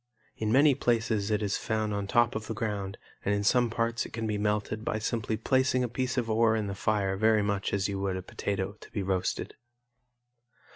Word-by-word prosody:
In 110 -1 -1
many 140 +4 +6
places 115 -5 0
it 105 0 +1
is 100 -1 0
found 110 -1 -1
on 100 -1 -2
top 120 +3 +3
of 110 -1 -4
the 110 - -4
ground 100 -3 -3 0.3
and 105 - +1
in 100 - -1
some 120 +3 +3
parts 115 +1 0
it - - -9
can 115 0 -3
be 105 -1 -1
melted 105 +1 -1
by 110 - -1
simply 110 0 -1
placing 130 0 +2
a - - 0
piece 125 +2 -2
of 120 -2 +1
ore 110 0 +3
in 110 -2 -1
the 100 - -3
fire 100 -1 0
very 110 +1 +3
much 100 -1 -1
as 100 -1 +1
you 100 -1 -3
would 95 -1 -1
a 95 - -6
potato 95 0 -3
to - - -12
be 100 - -2
roasted. 95 -1 -1
110 Hz, 215 wpm, -29 LUFS, 100-115 Hz, 0.3 s, many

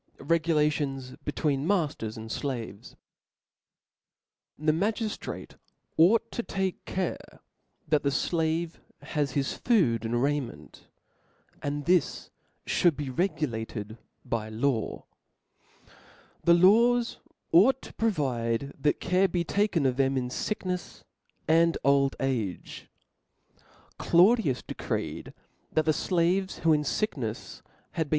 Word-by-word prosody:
Regulations 150 -4 0
between 145 -1 -1
Makers 150 - -1
and 110 0 -7
Slaves. 120 -8 -5 1.6
T^HE 155 0 +2
magiftrati 210 +4 -3 0.4
ought 225 +8 +4
to - - -2
take 190 -4 -3
care 185 -1 -4 0.5
that 150 -1 +2
the 140 - +1
^ 140 - 0
flave 165 0 -1 0.2
has 145 -4 -2
his 140 -1 0
food 150 - +2
and 115 +1 0
raiment; 145 -3 -3 0.7
and 145 0 -3
this 180 -1 +1 0.3
fhould 175 -4 +3
be 145 -3 -4
regulated 120 - -3 0.3
by 110 -2 -2
law. 115 +1 -1 1.4
The 170 - +7
laws 230 +7 +4 0.3
ought 245 +10 +6
to - - -11
provide 140 - -1
that 150 +2 +1
care 185 +2 +2
be 175 -1 -1
taken 200 -4 +1
of 130 -1 +1
them 135 0 +2
in 125 -1 -1
ficknefs 180 +4 -4 0.4
and 165 +1 +4
old 140 0 +3
age. 115 -9 -3 1.1
Claudius 180 - +4
('')de - - -7
(OXiphi* - - -11
creed, - - -3 0.4
that 155 - +1
the 155 - +4
fiaves, 180 +4 0
who, 165 -1 +4
in 150 - +2
ficknefs, 135 - -3 0.3
had 160 -2 -2
htt^clJ^io. - - -17
150 Hz, 115 wpm, -28 LUFS, 135-180 Hz, 1.6 s, The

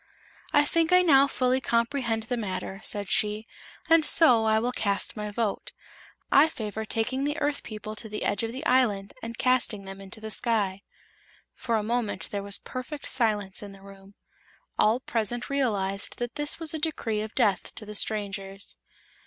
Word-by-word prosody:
"I 290 0 +5
think 330 +2 +1
I 365 0 +7
now 280 -5 +6
fully 255 -1 +1
comprehend 235 -1 0
the 245 +3 -2
matter," 195 -3 -4
said 205 -2 -2
she, 210 +2 0 0.4
"and 330 -1 +5
so 250 -9 +5
I 220 0 +4
will 240 +3 0
cast 200 -5 -1
my 210 -1 -4
vote. 210 -1 -2 0.6
I 295 +3 +6
favor 220 -5 -5
taking 245 +5 0
the 295 +2 -1
Earth 290 -2 -1
people 215 -1 -7
to 220 - -3
the 210 - -4
edge 205 - +1
of 225 0 -2
the 260 +3 -6
island 215 -6 +2
and 230 0 -6
casting 250 -6 +1
them 195 0 -8
into 195 +2 -10
the 220 0 -6
sky." 205 -5 0 0.7
For 235 - -2
a 215 - +1
moment 235 0 -2
there 200 - -2
was 200 0 -1
perfect 280 +3 -7
silence 210 -6 +1
in 200 -1 -9
the 195 0 -15
room. 195 0 -14 0.6
All 220 +3 +4
present 240 +2 -2
realized 205 -8 -1
that 240 0 -4
this 295 +1 -1
was 325 -2 0
a 315 - -2
decree 235 -9 -1
of 215 0 -6
death 210 -7 +1
to 215 - -7
the 210 - -8
strangers. 200 -2 -3
225 Hz, 180 wpm, -27 LUFS, 205-255 Hz, 0.7 s, I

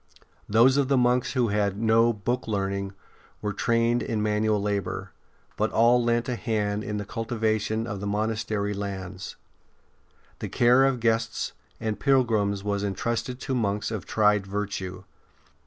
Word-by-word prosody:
Those 120 +6 +5
of 140 -2 +2
the 135 0 +3
monks 125 0 +2
who 125 -4 +2
had 100 -1 0
no 115 +1 +4
'' 100 -3 -17
book 125 0 0
learning 100 -2 -2 0.2
" - - -30
were 105 -1 -1
trained 115 +3 +1
in 110 -2 -2
manual 105 0 +1
labour; 100 -1 -2 0.4
but - - 0
all 120 +2 +4
lent 120 0 +1
a 125 - -1
hand 105 -3 -1
in 105 0 -3
the 105 - -4
cultivation 110 -1 -1
of 105 -4 -5
the 100 - -4
monastery 105 0 -1
lands. 95 -2 -6 1.0
The - - -4
care 125 +3 +5
of 135 -3 0
guests 115 0 0 0.3
and 110 -1 -3
pilgrims 110 -7 +2
was 100 -1 -1
en 100 -1 -2
trusted 120 +3 -2
to 135 - -3
monks 105 -3 -1
of 105 -6 -5
tried 105 -2 +2
virtue. 95 -2 -4
110 Hz, 160 wpm, -26 LUFS, 100-120 Hz, 1.0 s, Those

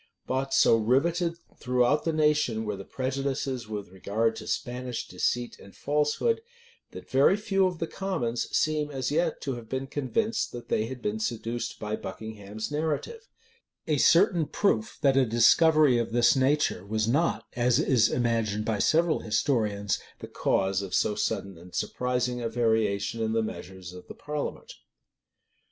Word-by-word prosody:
But 135 +1 -2
so 115 - +5
rivetted 165 +9 +1 0.2
throughout 125 +3 +2
the 165 - +2
nation 150 -8 +1
were 105 -1 -2
the 100 - -8
prejudices 130 -1 -3
with 105 -3 -6
regard 110 +5 -1
to - - -8
Spanish 125 -2 -3
deceit 120 -1 -2
and 100 - -15
falsehood, 150 - 0 0.5
that - - -11
very 140 +9 +4
few 195 -3 +2
of 180 -2 -4
the 165 - -2
commons 160 -12 -3
seem 155 -1 0
as 135 -2 -3
yet 165 +1 0
to 135 - -2
have 115 -2 -11
been 130 0 -2
convinced 150 - -1
that 120 -1 -8
they 110 +1 +1
had 125 -1 -8
been 105 +1 -1
seduced 115 +1 -3
by 105 0 -3
Buckingham's 110 +1 -7
narrative: 160 - -3 0.6
a 155 -2 +1
certain 165 +1 +4
proof 130 - 0
that 135 -2 +4
a 135 - +5
discovery 130 +4 +5
of 115 -1 -3
this 120 +1 +4
nature 135 -6 +1
was 110 +2 -1
not, 155 +8 +1
as 120 0 +3
is 130 -7 +3
imagined 115 -3 0
by 110 -2 -1
several 165 +5 +3
historians, 105 -3 0 0.2
the - - -9
cause 95 0 0
of 100 -2 -4
so 105 - +2
sudden 100 -3 -3
and 90 +1 -13
surprising 125 -1 -1
a 115 - -2
variation 110 -2 0
in 110 0 0
the 115 0 +1
measures 95 -4 -7
of 90 - -12
the - - -9
parliament. 150 -1 -5
125 Hz, 160 wpm, -27 LUFS, 110-150 Hz, 0.6 s, so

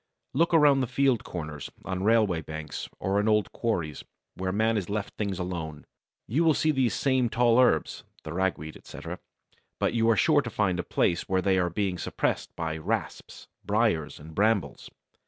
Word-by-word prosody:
Look 165 +5 +2
around 150 -4 +5
the 130 - 0
field 130 -2 +2
corners, 75 -4 -6 0.2
on 95 -1 -3
railway 105 -6 +3
banks, 80 -2 -6
or 100 +2 0
in 105 - 0
old 105 -3 +2
quarries, 85 - -2 0.3
where 95 0 -3
man 110 +3 +2
has 100 -4 -2
left 105 0 -3
things 100 -3 -2
alone. 85 -4 -5 0.4
You 145 +10 +1
will 160 -3 +4
see 155 - +2
these 130 -7 +1
same 130 -3 +2
tall 120 0 +3
herbs 130 - +2 0.2
(the 75 - -6
Ragweed, 80 -4 -2
etc.), - - -8 0.6
but - - +1
you 115 -1 +2
are 110 - +4
sure 150 -3 +4
to 125 - -5
find 100 -5 0
a - - -1
place 85 - 0
where 95 -1 +1
they 95 -1 +3
are 90 -1 +1
being 95 0 -2
suppressed - - -1
by 80 -1 -3
Rasps, 80 - -4 0.2
Briers, 100 -8 0
and 80 +2 -11
Brambles. 100 - 0
100 Hz, 180 wpm, -27 LUFS, 85-115 Hz, 0.6 s, around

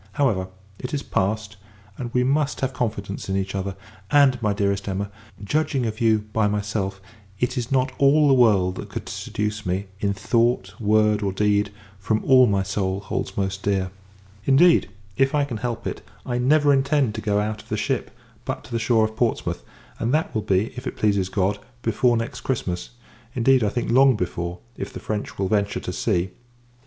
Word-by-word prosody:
However, 105 -10 +1 0.3
it 125 - -4
is 140 - -3
passed; 105 +2 -1 0.4
and, 120 +1 -5
we 125 +1 +2
must 145 +2 0
have 135 -1 -1
confidence 105 -6 -3
in 95 - 0
each 95 0 -2
other: 95 0 -3 0.3
and, 140 -4 +4
my 105 -2 +1
dearest 100 -1 0
Emma, 100 +1 -3 0.3
judging 140 +3 0
of 110 0 -4
you 110 -2 +3
by 110 -2 +3
myself, 105 -2 -2 0.4
it 125 - 0
is 125 -1 -3
not 130 -1 +2
all 145 +2 +5
the 140 - +5
world 100 -7 +4
that - - -7
could - - -6
seduce 105 0 -3
me, 95 +2 -1
in 100 -1 +1
thought, 115 -1 +1
word, 105 -1 +3
or 100 -2 0
deed, 105 +1 +1 0.3
from 110 +3 -1
all 130 -1 +7
my 100 -2 +1
soul 95 0 -1
holds 100 - -4
most 95 0 -1
dear. 95 -2 0 0.5
Indeed, 165 +6 +5 0.3
if 135 +1 +3
I 145 -1 +3
can 120 -5 -5
help 120 0 -4
it, - - -4 0.2
I 125 -1 -1
never 145 +3 +4
intend 135 -3 +2
to - - -5
go 105 -1 +1
out 105 +1 -2
of - - -22
the - - -1
ship, - - -1 0.3
but - - -4
to 110 - -15
the 115 - 0
shore 110 -1 +3
of 110 0 -5
Portsmouth; 115 0 -1 0.4
and 115 - 0
that 155 -4 -1
will 110 - 0
be, 100 +2 0
if 125 +1 -6
it - - -5
pleases 100 -3 +1
God, 100 +1 0 0.2
before 115 +2 +2
next 115 +5 -4
Christmas. 90 -9 -2 0.5
Indeed, 130 0 +4
I 105 - +2
think, 120 +2 -2
long 130 +1 +6
before, 90 -2 -3 0.2
if - - -5
the 125 - -7
French 105 -1 -4
will 95 - 0
venture 100 0 0
to 90 - -5
sea. 95 -3 0
110 Hz, 195 wpm, -23 LUFS, 100-125 Hz, 0.5 s, all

